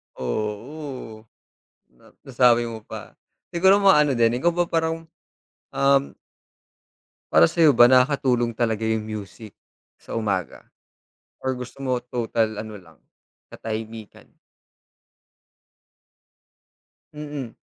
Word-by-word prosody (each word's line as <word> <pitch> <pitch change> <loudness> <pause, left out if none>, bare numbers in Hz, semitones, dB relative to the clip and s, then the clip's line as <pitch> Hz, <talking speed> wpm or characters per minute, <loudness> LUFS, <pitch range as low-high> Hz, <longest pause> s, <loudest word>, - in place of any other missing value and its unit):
Oo. 110 - -5 0.7
Na - - -22 0.2
nasabi 120 -2 +3
mo 115 -1 -6
pa. 105 - -10 0.4
Siguro 190 +3 +5
mga 195 -5 +6
ano 150 -2 +2
din, 115 -1 +3
ikaw 175 +5 +2
ba 175 0 +2
parang, 165 -1 -2 0.7
um 140 0 +2 1.2
para 80 +2 +6
sayo 150 - +4
ba, 120 +1 +7
nakakatulong 125 -3 +2
talaga 110 -1 -1
yung 110 -1 0
music 110 0 -8 0.5
sa - - -8
umaga? 100 -6 -2 0.8
Or 130 0 -2
gusto 125 +2 -9
mo 130 -3 -2
total 115 -3 -2
ano 110 0 -7
lang 80 -6 -16 0.5
katahimikan? 110 -1 -8 2.9
Mm. 145 -5 -7
120 Hz, 100 wpm, -23 LUFS, 110-140 Hz, 2.9 s, ba